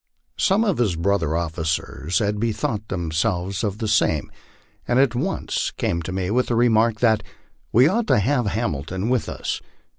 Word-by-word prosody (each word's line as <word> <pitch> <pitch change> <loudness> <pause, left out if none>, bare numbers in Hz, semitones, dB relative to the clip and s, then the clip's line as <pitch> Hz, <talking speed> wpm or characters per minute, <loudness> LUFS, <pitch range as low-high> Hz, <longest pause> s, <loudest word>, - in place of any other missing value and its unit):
Some 210 +1 +3
of 200 - 0
his 105 -8 +2
brother 85 -2 0
officers 80 0 -2
had 105 -2 0
bethought 110 -1 -2
themselves 90 +2 -1
of 105 -2 -1
the 110 - -3
same, 90 -8 +1 0.6
and 120 - +2
at 135 -3 +4
once 160 +11 -1
came 85 - -1
to 90 - -5
me 95 0 -2
with 125 +3 +2
the 120 - 0
remark 115 -1 +3
that 110 -3 +4 0.3
" - - -41
we 125 +5 +6
ought 220 +7 0
to - - +4
have 120 +2 +1
Ham 110 -1 0
ilton 95 - -4
with 125 -3 0
us." - - -4
105 Hz, 180 wpm, -22 LUFS, 90-120 Hz, 0.6 s, we